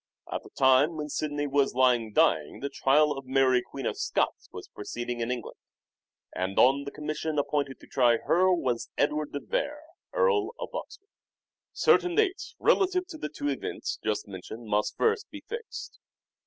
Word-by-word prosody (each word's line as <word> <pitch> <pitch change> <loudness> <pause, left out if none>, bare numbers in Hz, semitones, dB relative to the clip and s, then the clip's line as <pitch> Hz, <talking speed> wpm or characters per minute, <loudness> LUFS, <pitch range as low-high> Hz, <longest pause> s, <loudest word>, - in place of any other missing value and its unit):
At - - -2
the - - -14
time 135 +5 +4
when 150 -1 -4
Sidney 145 -1 -2
was 140 -2 +1
lying 125 -4 +3
dying 75 -7 +2
the 140 - -3
trial 150 +3 +3
of 135 -2 -5
Mary 130 -1 +3
Queen 135 +1 -8
of - - -2
Scots - - -1
was - - -9
proceeding 120 +3 -5
in 115 0 -2
England, 125 -2 -4 0.8
and 95 +1 -2
on 140 +2 +5
the 140 - -5
commission 155 +1 -3
appointed 145 -1 -1
to - - -13
try 120 -3 +3
her 185 +8 +3
was 130 -9 0
Edward 150 +1 0
de 145 - -3
Vere, 295 +1 -2 0.3
Earl 475 -4 +2
of - - -5
Oxford. 410 -4 -8 0.6
Certain 355 -1 +3
dates 405 -1 0
relative 370 -1 +2
to 315 - -8
the - - -4
two 145 0 -3
events 135 - -4
just 110 -1 -1
mentioned 100 +4 -8
must 105 0 0
first 450 -1 +1
be - - -10
fixed. 460 +1 -7
140 Hz, 170 wpm, -28 LUFS, 125-185 Hz, 0.8 s, on